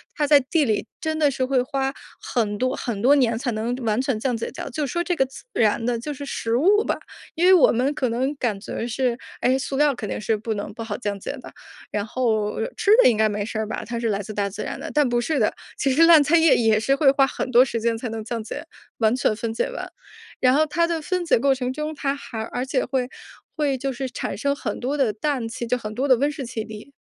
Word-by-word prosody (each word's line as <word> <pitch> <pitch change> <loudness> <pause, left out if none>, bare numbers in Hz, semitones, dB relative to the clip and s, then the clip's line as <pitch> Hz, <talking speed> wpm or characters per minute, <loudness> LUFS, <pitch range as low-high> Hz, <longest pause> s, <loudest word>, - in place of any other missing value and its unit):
它 295 - +1
在 290 -1 +6
地 290 +3 +1
里 215 -1 0
真 315 -2 -2
的 295 -2 +4
是 260 -1 -1
会 260 -1 +2
花 270 +1 -2 0.3
很 210 -4 -1
多 255 +3 0
很 230 -6 -4
多 270 +6 +5
年 235 -5 +2
才 245 0 -2
能 225 +3 -2
完 220 +3 +1
全 265 -5 -1
降 250 0 0
解 225 - -4
掉。 - - -7
就 295 +1 -2
说 345 +6 -1
这 355 -1 -1
个 265 - +3
自 265 - -12
然 225 +1 +2
的 240 -1 0
就 295 +6 -5
是 285 - -7
食 230 -4 -2
物 405 +9 +4
吧， - - -1 0.4
因 345 +3 +2
为 375 - +7
我 350 - +6
们 255 +5 +1
可 255 -5 -1
能 260 +5 -1
感 215 -7 -1
觉 230 +3 -5
是， 245 0 0 0.3
哎， 255 +1 +3
塑 270 0 -3
料 295 -1 +4
肯 215 -5 -6
定 - - -3
是 220 +1 0
不 220 +1 -3
能 205 0 -5
不 230 - -8
好 215 -2 -4
降 205 -4 -3
解 275 - -5
的。 265 - -11 0.4
然 205 - -1
后， 220 -4 0 0.2
吃 410 - -1
的 - - +7
应 235 - +4
该 215 0 +3
没 205 0 -2
事 220 0 -4
儿 215 - -2
吧？ - - -5
它 235 0 -4
是 230 -1 -1
来 200 -1 0
自 210 +1 -6
大 200 -1 -1
自 200 +2 -6
然 - - -5
的。 - - -6
但 295 -3 +3
不 240 0 +1
是 300 +4 -1
的， 215 - +2 0.2
其 270 - +1
实 300 +5 +2
烂 325 -3 +8
菜 330 +4 +4
叶 325 -2 +5
也 220 -2 +3
是 270 +5 +2
会 275 -2 +5
花 275 -1 +3
很 255 - -4
多 245 +1 +7
时 235 -3 -2
间 230 0 0
才 230 +1 -5
能 220 -1 -5
降 230 -1 -4
解， - - -7 0.3
完 225 +1 +2
全 220 -4 +1
分 225 0 -3
解 - - -1
完。 - - -6 0.5
然 255 +1 +4
后 310 +1 +4
它 335 +3 +1
的 335 -1 -1
分 365 +2 -1
解 330 - +3
过 275 +3 +3
程 255 -1 -2
中， 305 +3 -4
它 280 -1 -2
还 225 -5 -7
而 250 +3 -4
且 265 -1 0
会 255 -2 -1 0.5
会 285 -4 0
就 270 +1 -2
是 260 +1 -4
产 - - -4
生 280 +5 0
很 220 -7 -4
多 275 +4 -1
的 240 -7 +2
氮 255 0 -2
气 235 +1 -5
就 250 +2 0
很 215 -2 -7
多 270 +3 0
的 255 - +6
温 285 +3 +1
室 280 -3 -6
气 225 -2 -4
体。 215 +5 -10
250 Hz, 290 characters per minute, -23 LUFS, 225-280 Hz, 0.5 s, 烂